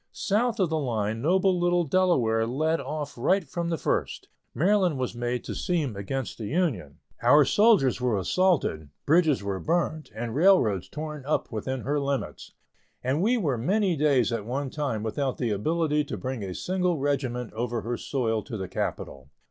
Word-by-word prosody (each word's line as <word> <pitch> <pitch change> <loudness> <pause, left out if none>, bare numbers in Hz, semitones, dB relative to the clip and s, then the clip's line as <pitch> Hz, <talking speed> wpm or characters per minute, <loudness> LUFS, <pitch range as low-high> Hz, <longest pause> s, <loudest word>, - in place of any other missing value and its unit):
South 225 +3 0
of 180 -4 +1
the 160 - +1
line 110 -5 -2
noble 185 +4 +2
little 175 0 +2
Delaware 135 -10 +2
led 155 +6 0
off 150 -1 -5
right 180 +8 +1
from 170 +4 -3
the 165 - -1
first. - - -2 0.3
Maryland 185 -3 +2
was 130 -1 -2
made 120 +1 -2
to - - -5
seem 155 - -1
against 120 +7 -4
the 110 - -4
Union. 125 - -1 0.2
Our 140 +5 +6
soldiers 200 - +4
were 125 -4 +1
assaulted, 100 - +1 0.2
bridges 155 - +3
were 100 -1 -2
burned, 160 - -1
and 115 0 -4
railroads 140 - +3
torn 150 -2 -6
up 155 - -1
within 125 +4 -3
her 145 +4 -1
limits, 140 -1 -3 0.5
and 135 +6 0
we 235 +6 +3
were 145 - 0
many 190 - +1
days 135 -6 +2
at 115 -3 -2
one 130 +4 -3
time 135 -8 -2
without 130 +4 -2
the 120 -4 -1
ability 150 +7 +1
to 145 - -5
bring 130 -3 -4
a 95 -2 -5
single 180 -2 0
regiment 130 -4 -2
over 120 +1 -2
her 120 +2 -3
soil 115 -4 -1
to 115 - -5
the 95 -1 -4
capital. 70 -6 -4
140 Hz, 175 wpm, -26 LUFS, 115-170 Hz, 0.5 s, Our